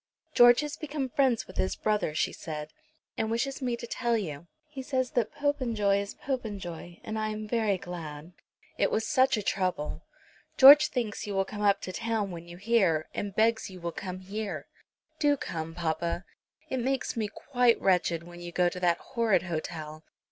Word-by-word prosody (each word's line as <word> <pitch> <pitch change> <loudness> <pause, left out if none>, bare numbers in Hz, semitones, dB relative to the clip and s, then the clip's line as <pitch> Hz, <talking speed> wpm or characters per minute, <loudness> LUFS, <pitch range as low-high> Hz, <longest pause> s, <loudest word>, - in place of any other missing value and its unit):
"George 240 0 +7
has 295 -1 -5
become 290 -4 -3
friends 255 -3 +2
with 185 - -13
his 185 - 0
brother," 210 -8 0
she - - 0
said, 150 -2 -6 0.5
"and 220 - 0
wishes 265 +5 -1
me 245 -2 0
to 235 - -7
tell 235 -1 0
you. 170 -5 -5 0.2
He 295 -3 -7
says 260 -1 -1
that 235 -4 0
Popenjoy 235 -9 +1
is 200 - -7
Popenjoy, 195 - -5
and 220 0 -4
I 215 - 0
am 215 0 -5
very 215 -3 +1
glad. 170 -3 -8 0.5
It - - +3
was 220 - 0
such 260 -2 +3
a 210 - -3
trouble. 185 -7 -1 0.6
George 285 +3 +10
thinks 225 -4 -3
you 200 - -3
will 195 0 +2
come 210 +1 -7
up 200 -1 +3
to 185 - -6
town 225 -3 -1
when 170 -1 -8
you 175 0 -10
hear, 190 -7 +2
and 200 -1 -4
begs 220 0 +2
you 185 -1 -10
will 170 0 -3
come 185 +1 -6
here. 205 +2 -5 0.5
Do 290 -2 +3
come, 165 -7 -5
papa! 170 +2 -2 0.4
It 260 - -2
makes 260 +2 -1
me 220 -2 -1
quite 245 +1 +2
wretched 175 -3 +2
when 175 0 -11
you 175 0 -7
go 175 0 +2
to 180 - -7
that 175 -2 +2
horrid 230 -2 +1
hotel. 155 -2 -5
205 Hz, 185 wpm, -29 LUFS, 175-240 Hz, 0.6 s, George